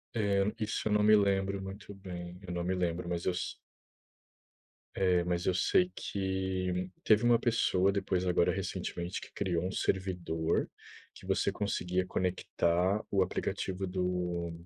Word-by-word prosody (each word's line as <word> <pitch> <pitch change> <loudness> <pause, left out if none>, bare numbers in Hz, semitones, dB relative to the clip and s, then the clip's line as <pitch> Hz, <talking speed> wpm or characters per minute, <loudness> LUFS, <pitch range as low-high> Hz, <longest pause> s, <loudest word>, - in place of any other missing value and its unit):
É, 100 -3 +2 0.2
isso 110 0 -1
eu - - 0
não 105 0 +4
me 105 0 +7
lembro 100 -1 +2
muito 100 +2 -8
bem, 90 -2 -8
eu 90 - -4
não 85 0 -2
me 95 +1 0
lembro, 85 -1 -1
mas 85 0 -2
eu 95 - +2
se 90 - -3 1.4
é, 90 -2 +3
mas 90 0 -1
eu 95 - +3
sei 180 - +3
que 95 -2 -2
teve 110 +1 +5
uma 120 -1 +5
pessoa 100 -5 +2
depois, 95 -2 0
agora 85 -1 +3
recentemente, 90 -1 -3
que - - -11
criou 90 -3 -1
um 95 - -2
servidor 90 -4 0 0.5
que - - -13
você - - +1
conseguia 95 -2 -1
conectar 90 +1 0
o 100 -1 +3
aplicativo 95 0 -2
do 90 -2 -1
95 Hz, 150 wpm, -32 LUFS, 90-100 Hz, 1.4 s, me